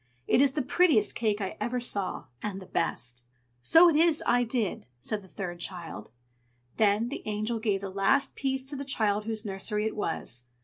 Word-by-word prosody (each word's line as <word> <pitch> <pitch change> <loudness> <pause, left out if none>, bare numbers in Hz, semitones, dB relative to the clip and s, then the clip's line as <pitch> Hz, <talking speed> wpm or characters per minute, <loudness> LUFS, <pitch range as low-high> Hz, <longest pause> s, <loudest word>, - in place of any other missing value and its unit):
It 255 - +4
is 275 -1 +4
the 295 - -1
prettiest 295 - +3
cake 215 -2 0
I 190 - -4
ever 240 +3 -1
saw, 200 -9 -3 0.2
and 200 -2 -4
the 190 - -10
best." 125 -8 -3 0.4
"So 325 - +7
it 330 - +4
is 325 0 +3
I 245 0 +3
did!" 225 - -2
said 210 - -3
the 190 - -16
third 175 -2 -6
child. 170 - -6 0.7
Then 215 +2 +3
the 280 - -5
Angel 215 +2 -2
gave 205 -3 0
the 195 -1 -5
last 265 +9 +2
piece 265 -1 -2
to 280 +2 -2
the 280 - -4
child 210 -6 0
whose 220 0 -3
nursery 210 +2 -2
it 220 - -2
was. 160 - -3
215 Hz, 190 wpm, -28 LUFS, 195-255 Hz, 0.7 s, So